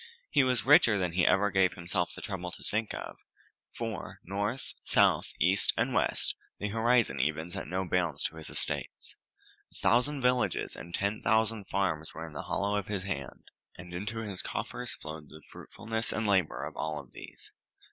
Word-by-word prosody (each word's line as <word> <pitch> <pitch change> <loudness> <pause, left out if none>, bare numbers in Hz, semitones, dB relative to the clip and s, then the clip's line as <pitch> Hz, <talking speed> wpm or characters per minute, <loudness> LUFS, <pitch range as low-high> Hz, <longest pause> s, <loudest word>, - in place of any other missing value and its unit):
He 140 - +5
was 125 -2 +2
richer 125 -6 +7
than 90 -3 0
he 90 +1 +3
ever 100 +1 +4
gave 95 -2 +3
himself 90 0 -1
the - - -9
trouble 90 -3 -4
to - - -9
think 110 0 0
of, - - -6 0.5
for, - - -5
north, 105 +7 -2
south, - - +4
east, 95 +5 +4
and - - +1
west, - - +2 0.2
the 105 - -2
horizon 115 - +3
even 80 +5 0
set - - -4
no 95 +2 -1
bounds 85 -5 0
to 80 -1 -1
his 80 - -8
estates. - - -2 0.6
A - - -18
thousand 135 +4 +2
villages 125 -1 +1
and 85 0 -6
ten 100 +2 -1
thousand 110 0 +2
farms 80 -6 -1
were 80 +1 -5
in 80 - -10
the 75 - -4
hollow 100 +1 0
of 100 - -7
his 100 -3 -2
hand, 80 -10 -6 0.3
and 90 0 -10
into 110 +5 -3
his 95 -3 -3
coffers - - -4
flowed 75 -1 -8
the 80 -1 -13
fruitfulness 115 -1 -4
and 110 - -1
labor 95 -6 +2
of - - -6
all 75 -3 -3
these. - - -11
95 Hz, 180 wpm, -30 LUFS, 85-110 Hz, 0.6 s, richer